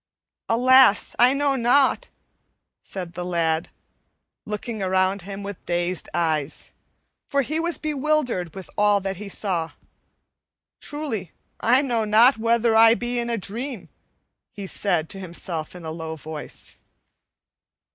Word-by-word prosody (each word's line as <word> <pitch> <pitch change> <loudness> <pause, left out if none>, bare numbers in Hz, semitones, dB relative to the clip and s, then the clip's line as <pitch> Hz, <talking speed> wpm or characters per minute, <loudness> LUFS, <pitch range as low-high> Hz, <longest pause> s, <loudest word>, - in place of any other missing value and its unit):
"Alas! 250 -1 +5
I 250 +3 +6
know 280 -1 +1
not," 265 - +3 0.7
said 180 -3 -6
the 180 - -5
lad, 170 -2 0 0.8
looking 215 +1 -4
around 190 +1 +1
him 200 +2 -7
with 200 -2 -7
dazed 175 0 -1
eyes, 155 -3 -1 0.6
for 280 -1 +2
he 310 +5 -2
was 340 +1 0
bewildered 295 - -1
with 190 -3 -8
all 205 -1 +4
that 195 -1 -3
he 205 +1 -7
saw. 180 -5 -1 1.1
"Truly, 275 - -5 0.3
I 250 +5 +4
know 240 -5 0
not 225 +4 +5
whether 230 0 +2
I 225 +1 +7
be 240 0 -2
in 235 0 -2
a 235 - 0
dream," 225 +3 -6 0.8
said 190 -3 0
he - - -23
to 195 - -5
himself 170 -2 -4
in 175 -2 -9
a 160 - -4
low 160 0 -5
voice. 155 0 -8
210 Hz, 135 wpm, -23 LUFS, 180-245 Hz, 1.1 s, I